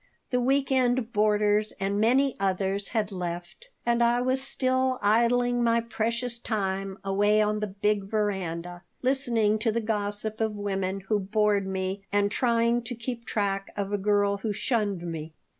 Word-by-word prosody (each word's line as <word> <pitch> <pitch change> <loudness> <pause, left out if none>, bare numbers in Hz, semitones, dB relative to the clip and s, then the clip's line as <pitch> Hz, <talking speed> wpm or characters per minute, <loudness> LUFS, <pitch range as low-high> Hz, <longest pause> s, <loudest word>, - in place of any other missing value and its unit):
The 250 -1 +2
week 270 +2 +1
end 250 -2 +1
boarders 210 0 +2
and 200 +1 0
many 260 +4 +3
others 195 +1 0
had 220 -3 -1
left, 175 - -6 0.2
and 235 0 +2
I 235 +1 +3
was 255 +1 0
still 260 -1 +1
idling 240 +3 +2
my 230 0 +3
precious 235 +1 -2
time 195 -4 -2
away 205 +2 +2
on 210 0 +1
the 210 - -2
big 205 +1 0
veranda, 180 -5 -2 0.2
listening 235 -5 +2
to 225 +1 +1
the 230 - 0
gossip 215 0 -2
of 220 -1 0
women 195 -1 -2
who 205 +2 0
bored 205 0 +1
me 190 +1 -3
and 205 0 +2
trying 235 0 +2
to 245 - -4
keep 235 0 -5
track 195 -2 -1
of 200 0 -2
a - - +2
girl 205 0 +2
who 210 +2 -3
shunned 205 -6 -1
me. 160 -2 -6
210 Hz, 160 wpm, -27 LUFS, 195-235 Hz, 0.2 s, many